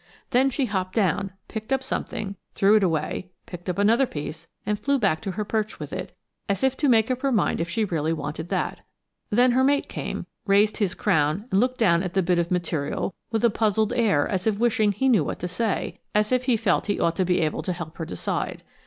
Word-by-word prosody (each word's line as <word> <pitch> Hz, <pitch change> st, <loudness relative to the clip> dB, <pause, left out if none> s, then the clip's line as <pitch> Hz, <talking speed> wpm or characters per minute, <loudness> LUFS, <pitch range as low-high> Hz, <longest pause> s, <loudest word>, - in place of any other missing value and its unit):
Then 260 Hz, +2 st, +4 dB
she 270 Hz, +1 st, 0 dB
hopped 190 Hz, -4 st, -2 dB
down, 195 Hz, -2 st, +1 dB, 0.2 s
picked 220 Hz, +2 st, -7 dB
up 265 Hz, 0 st, +1 dB
something, 200 Hz, -5 st, -4 dB, 0.2 s
threw 200 Hz, +2 st, +5 dB
it 215 Hz, -, +5 dB
away, 180 Hz, +1 st, -1 dB, 0.2 s
picked 175 Hz, 0 st, -8 dB
up 180 Hz, -, -2 dB
another 230 Hz, +6 st, +4 dB
piece 155 Hz, 0 st, -6 dB, 0.2 s
and 210 Hz, -1 st, -1 dB
flew 280 Hz, +6 st, +1 dB
back 195 Hz, -10 st, +1 dB
to 200 Hz, -4 st, -3 dB
her 210 Hz, +3 st, -3 dB
perch 215 Hz, 0 st, -2 dB
with -, -, -7 dB
it, -, -, -6 dB, 0.3 s
as 200 Hz, +2 st, 0 dB
if 265 Hz, 0 st, +3 dB
to 290 Hz, -, +2 dB
make 225 Hz, 0 st, +4 dB
up 255 Hz, 0 st, -2 dB
her 275 Hz, -, +1 dB
mind 215 Hz, -7 st, +1 dB
if 170 Hz, -, -2 dB
she 215 Hz, +5 st, 0 dB
really 160 Hz, -4 st, -1 dB
wanted 160 Hz, +1 st, -4 dB
that. -, -, -2 dB, 0.5 s
Then 245 Hz, +3 st, +4 dB
her 260 Hz, +2 st, +3 dB
mate 280 Hz, +1 st, +2 dB
came, -, -, -5 dB, 0.2 s
raised 205 Hz, +2 st, +4 dB
his 200 Hz, -5 st, 0 dB
crown 160 Hz, 0 st, +1 dB
and 190 Hz, -, +3 dB
looked 255 Hz, +2 st, +1 dB
down 170 Hz, -7 st, +4 dB
at 185 Hz, -1 st, -4 dB
the 190 Hz, -, +3 dB
bit 175 Hz, 0 st, +2 dB
of 170 Hz, 0 st, 0 dB
material 170 Hz, -1 st, -1 dB, 0.2 s
with 225 Hz, 0 st, +1 dB
a 235 Hz, -, +4 dB
puzzled 215 Hz, 0 st, +1 dB
air 205 Hz, -12 st, +2 dB
as 190 Hz, +1 st, -2 dB
if 215 Hz, -2 st, +2 dB
wishing 220 Hz, -2 st, +2 dB
he 265 Hz, +7 st, 0 dB
knew 225 Hz, -, +4 dB
what -, -, -3 dB
to 180 Hz, -, -4 dB
say; 195 Hz, +3 st, -2 dB, 0.2 s
as 210 Hz, +1 st, +2 dB
if 255 Hz, 0 st, +2 dB
he 250 Hz, -3 st, +3 dB
felt -, -, +1 dB
he 205 Hz, -, 0 dB
ought 165 Hz, 0 st, +1 dB
to 190 Hz, -, +3 dB
be 180 Hz, 0 st, +1 dB
able 155 Hz, -3 st, 0 dB
to 185 Hz, -, -3 dB
help 170 Hz, -2 st, -6 dB
her 165 Hz, -, -2 dB
decide. 90 Hz, -, -3 dB
200 Hz, 235 wpm, -25 LUFS, 175-230 Hz, 0.5 s, threw